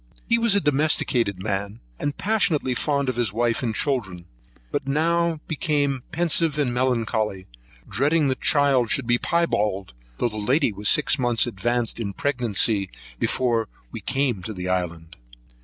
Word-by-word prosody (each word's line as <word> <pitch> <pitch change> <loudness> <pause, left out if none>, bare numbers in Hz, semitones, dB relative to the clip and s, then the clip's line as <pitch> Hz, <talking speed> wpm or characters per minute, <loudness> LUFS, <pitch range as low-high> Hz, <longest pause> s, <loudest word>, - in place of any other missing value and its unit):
He 235 0 +3
was 230 -3 +3
a - - +5
domesticated 135 - +1
man, 100 +1 -3 0.2
and 145 -1 -3
passionately 185 -11 +1
fond 140 +2 0
of 130 -2 -2
his 120 -5 0
wife 115 +2 0
and 115 -3 -2
children; 95 - -2 0.5
but - - -2
now 165 +2 +1
became 145 -4 0
pensive 165 -2 +1
and 135 -5 +1
melancholy, 110 -6 -1 0.4
dreading 145 - +2
the 130 - +2
child 135 -3 +2
should 140 - +1
be 120 0 +2
Piebald; 105 - 0 0.2
though 120 - 0
the 110 - -8
lady 125 +3 +2
was 100 +1 0
six 150 -1 +3
months 120 -2 +2
advanced 120 +2 -2
in 115 - -2
her 100 - -6
pregnancy 110 -6 0 0.3
before 120 -4 0 0.2
we - - -7
came 130 -6 0
to 110 +5 -6
the 90 -2 -5
island. 85 -3 -3
125 Hz, 155 wpm, -23 LUFS, 105-145 Hz, 0.5 s, a